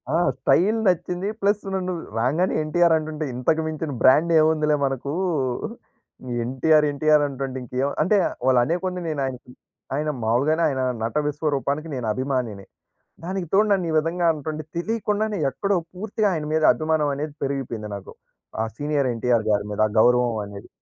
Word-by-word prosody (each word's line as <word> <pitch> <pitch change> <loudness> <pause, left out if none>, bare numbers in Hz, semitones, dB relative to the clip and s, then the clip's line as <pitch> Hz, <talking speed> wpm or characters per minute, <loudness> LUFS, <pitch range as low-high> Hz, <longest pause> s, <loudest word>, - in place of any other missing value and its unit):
ఆ! - - +4 0.2
స్టైల్ 215 +6 +3
నచ్చింది. 180 +1 0
ప్లస్ 205 +1 +1
నన్ను 185 -1 -1 0.3
రాంగానే 150 +11 +1
ఎన్టీఆర్ 170 +2 +3
అంటుంటే, 155 0 -4
ఇంతకు 155 +6 +1
మించిన 155 -1 -4
బ్రాండ్ 155 +6 +5
ఏముందిలే 155 -1 +3
మనకు 135 +1 -3 1.3
ఎన్‌టి‌ఆర్‌, 150 +5 +3
ఎన్‌టి‌ఆర్‌ 150 +1 +3
అంటుంటే 135 -1 -5
ఇంకేం 130 +3 -2
అంటే 205 +4 +3 0.3
వాళ్ళు 130 -2 +5
అనే 160 +8 0
కొంది 180 -1 -2
నేనాయనకి 135 -5 -4 0.4
ఆయన 150 +2 -1
మావూలుగానే 140 +9 +2
ఆయన 130 -2 -2 0.2
నట 115 - -3
విశ్వరూపానికి 145 +1 -1
నేను 125 -3 -3
అభిమానిని. 125 -5 -3 0.6
దానికి 185 -1 -3
తోడు 210 +2 +5
నన్ను 185 -4 +2
ఈ - - -2
విధంగా 170 +2 0
అంటుంటే, 155 +1 -5
తెలియకుండానే 215 +1 -1
ఎక్కడో 200 +8 0 0.2
పూర్తిగా 210 +2 -1
ఆయన 155 -3 -3
మీద 160 - +1
అభిమానం 155 -2 0
అనేది 150 +1 -4
పెరిగిపేయింది 130 -6 -3
నాకు. 100 - -9 0.5
ఆహ్, 110 - -2
సీనియర్ 145 -3 0
ఎన్‌టి‌ఆర్‌ 115 -1 +1
గారి 105 0 +1
మీద 105 - -5
ఆ - - -8
గౌరవం 120 -1 +4
అనేది. 100 0 -10
150 Hz, 150 wpm, -23 LUFS, 130-170 Hz, 1.3 s, బ్రాండ్